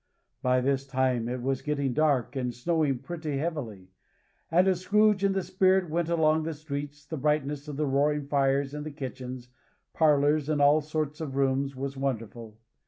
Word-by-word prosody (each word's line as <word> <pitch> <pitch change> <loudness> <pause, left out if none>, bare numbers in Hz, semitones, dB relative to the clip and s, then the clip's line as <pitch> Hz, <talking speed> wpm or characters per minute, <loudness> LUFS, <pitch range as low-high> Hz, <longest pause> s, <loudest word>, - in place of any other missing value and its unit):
By 125 0 +2
this 135 +1 0
time 130 -3 0
it 125 0 -4
was 135 0 -1
getting 140 -3 -1
dark 145 -3 +1
and 125 -2 -1
snowing 145 +2 0
pretty 160 -2 -4
heavily; 120 - -4 0.6
and 180 +3 +4
as 185 -2 +2
Scrooge 210 +1 +3
and 195 -1 +2
the 190 - 0
Spirit 185 -1 +2
went 170 0 0
along 160 -2 +3
the 160 0 -4
streets, 145 0 -6
the 160 +1 -5
brightness 150 0 -1
of 145 -2 -6
the 155 - 0
roaring 145 +1 +1
fires 140 0 +1
in 150 +1 -5
kitchens, 130 -3 -7 0.4
parlors, 150 -1 +3
and 150 -2 +1
all 145 +2 +5
sorts 150 0 -3
of 140 -4 -5
rooms, 135 0 0
was 135 +1 -5
wonderful. 115 -4 -4
145 Hz, 170 wpm, -28 LUFS, 135-155 Hz, 0.6 s, all